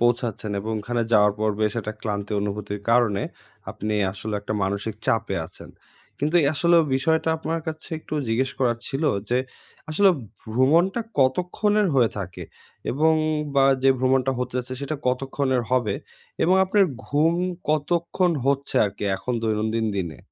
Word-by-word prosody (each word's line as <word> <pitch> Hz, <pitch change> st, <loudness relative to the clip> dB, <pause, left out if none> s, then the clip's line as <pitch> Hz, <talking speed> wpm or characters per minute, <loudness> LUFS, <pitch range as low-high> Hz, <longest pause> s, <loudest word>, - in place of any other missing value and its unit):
পৌঁছাচ্ছেন। 120 Hz, -3 st, 0 dB
এবং 110 Hz, +3 st, -4 dB
ওখানে 120 Hz, +2 st, -1 dB
যাওয়ার 105 Hz, -1 st, +5 dB
পর 110 Hz, 0 st, +1 dB
বেশ 105 Hz, -1 st, +2 dB
একটা 110 Hz, 0 st, -5 dB
ক্লান্তি 105 Hz, -1 st, -3 dB
অনুভূতির 105 Hz, 0 st, -4 dB
কারণে 115 Hz, -5 st, +3 dB, 0.5 s
আপনি 105 Hz, +1 st, -3 dB, 0.2 s
আসলে 105 Hz, +1 st, -5 dB
একটা 105 Hz, -, -4 dB
মানসিক 100 Hz, +3 st, -2 dB
চাপে 115 Hz, -3 st, +1 dB
আছেন। -, -, -14 dB, 0.5 s
কিন্তু 150 Hz, +5 st, +1 dB, 0.2 s
আসলে 170 Hz, +4 st, +4 dB, 0.2 s
বিষয়টা 160 Hz, +4 st, +1 dB
আপনার 160 Hz, +1 st, -3 dB
কাছে 155 Hz, -1 st, -6 dB
একটু 155 Hz, -, -7 dB
জিজ্ঞেস 130 Hz, +4 st, +1 dB
করার 120 Hz, -3 st, +1 dB
ছিল 135 Hz, +3 st, -3 dB, 0.3 s
যে, 125 Hz, -, +3 dB, 0.5 s
আসলে 195 Hz, +5 st, +5 dB, 0.4 s
ভ্রমণটা 165 Hz, -, +3 dB, 0.2 s
কতক্ষণের 180 Hz, +10 st, +2 dB
হয়ে 120 Hz, -4 st, +4 dB
থাকে, 90 Hz, -3 st, -6 dB, 0.5 s
এবং 160 Hz, +5 st, +3 dB, 0.4 s
বা 135 Hz, -1 st, +5 dB, 0.2 s
যে 135 Hz, -, +6 dB
ভ্রমণটা 130 Hz, +1 st, +2 dB
হতে 125 Hz, 0 st, -3 dB
যাচ্ছে 130 Hz, +1 st, -4 dB
সেটা 145 Hz, +2 st, -3 dB
কতক্ষণের 130 Hz, 0 st, 0 dB
হবে? 120 Hz, -6 st, +1 dB, 0.5 s
এবং 180 Hz, -, +4 dB
আপনার 195 Hz, +1 st, +4 dB, 0.2 s
ঘুম 155 Hz, +4 st, +2 dB, 0.4 s
কতক্ষণ 170 Hz, +4 st, +1 dB, 0.2 s
হচ্ছে 140 Hz, 0 st, 0 dB
আরকি 100 Hz, +1 st, -4 dB
এখন 125 Hz, +6 st, -4 dB
দৈনন্দিন 110 Hz, 0 st, 0 dB
দিনে? 85 Hz, -7 st, -3 dB
125 Hz, 145 wpm, -24 LUFS, 110-155 Hz, 0.5 s, যে